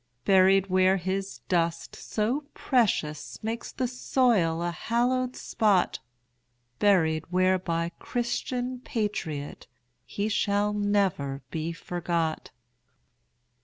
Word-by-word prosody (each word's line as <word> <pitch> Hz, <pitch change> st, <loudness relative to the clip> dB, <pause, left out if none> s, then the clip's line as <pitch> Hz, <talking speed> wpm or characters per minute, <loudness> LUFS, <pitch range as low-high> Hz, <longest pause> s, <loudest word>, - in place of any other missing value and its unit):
Buried 190 Hz, 0 st, +5 dB
where 185 Hz, 0 st, +3 dB
his 190 Hz, +2 st, -3 dB
dust 170 Hz, -2 st, 0 dB
so 240 Hz, +8 st, -2 dB
precious 180 Hz, -, 0 dB
Makes 225 Hz, +2 st, -4 dB
the 255 Hz, -, -1 dB
soil 235 Hz, -9 st, +1 dB
a 175 Hz, -, -1 dB
hallowed 245 Hz, +6 st, 0 dB
spot; 205 Hz, -4 st, +1 dB, 0.8 s
Buried 165 Hz, -6 st, +3 dB
where 185 Hz, +1 st, +3 dB
by 170 Hz, -1 st, -1 dB
Christian 245 Hz, +1 st, -2 dB
patriot 205 Hz, -, -4 dB, 0.4 s
He 200 Hz, +11 st, -3 dB
shall 205 Hz, -1 st, +1 dB
never 195 Hz, -10 st, 0 dB
be 160 Hz, 0 st, -2 dB
forgot. 170 Hz, -1 st, -2 dB
195 Hz, 95 wpm, -27 LUFS, 170-225 Hz, 0.8 s, Buried